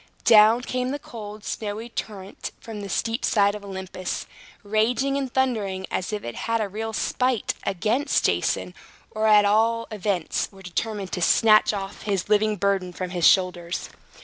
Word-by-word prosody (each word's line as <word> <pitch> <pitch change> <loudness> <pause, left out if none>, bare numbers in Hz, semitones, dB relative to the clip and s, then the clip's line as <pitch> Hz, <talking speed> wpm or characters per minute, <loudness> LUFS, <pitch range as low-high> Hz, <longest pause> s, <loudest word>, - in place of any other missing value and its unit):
Down 220 +2 +7
came 250 0 -2
the 285 - -2
cold, 215 -6 -9
snowy 215 +2 -4
torrent 205 -4 -6
from 220 -2 -8
the 200 - -6
steep 225 +5 -1
side 200 -2 +3
of 210 -1 -8
Olympus, 190 -2 -5 0.4
raging 230 +6 +1
and 270 -2 -2
thundering 215 -8 0
as 185 - -2
if 210 -1 -4
it 120 - -5 0.2
had 230 0 +2
a 215 - -1
real 220 +3 -4
spite 250 +1 0
against 220 - +1
Jason, - - 0 0.4
or, 215 0 0
at 210 -1 +6
all 225 +3 +2
events, 195 -5 -1
were 195 -1 -15
determined 195 +2 -3
to 180 - -3
snatch 215 +5 +5
off 195 -1 -5
his 200 -2 -2
living 215 0 +3
burden 195 -2 0
from 180 0 -5
his 175 -3 +3
shoulders. 180 -2 +1
210 Hz, 165 wpm, -24 LUFS, 195-225 Hz, 0.4 s, Down